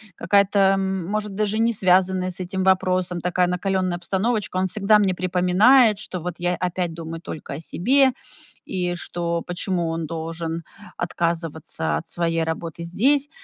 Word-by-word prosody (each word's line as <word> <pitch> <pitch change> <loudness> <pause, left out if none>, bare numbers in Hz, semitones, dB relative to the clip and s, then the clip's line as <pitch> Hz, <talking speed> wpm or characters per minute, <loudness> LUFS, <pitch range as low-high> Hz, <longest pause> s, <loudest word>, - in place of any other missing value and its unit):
какая-то, 200 +3 +2
м, 190 -2 +2
может, 210 -1 -3
даже 215 +1 0
не 230 +1 +2
связанная 185 -1 +2
с 180 - -8
этим 185 +1 -3
вопросом, 185 -1 +1
такая 180 0 +1
накалённая 185 0 -1
обстановочка, 200 +3 -1
он 185 0 +1
всегда 210 +2 +3
мне 195 -2 +2
припоминает, 185 +6 +4
что 180 -5 -4
вот 175 0 -4
я 175 0 0
опять 180 -1 -2
думаю 165 0 -7
только 150 -4 -7
о 145 - -5
себе, 260 +10 +2 0.5
и 180 -2 -2
что 170 -1 -3
почему 175 -1 -2
он 165 0 -3
должен 165 +1 -4 0.3
отказываться 165 - -2
от - - -7
своей 165 -1 0
работы 165 +1 -4
здесь. 275 - +2
180 Hz, 150 wpm, -23 LUFS, 170-195 Hz, 0.5 s, припоминает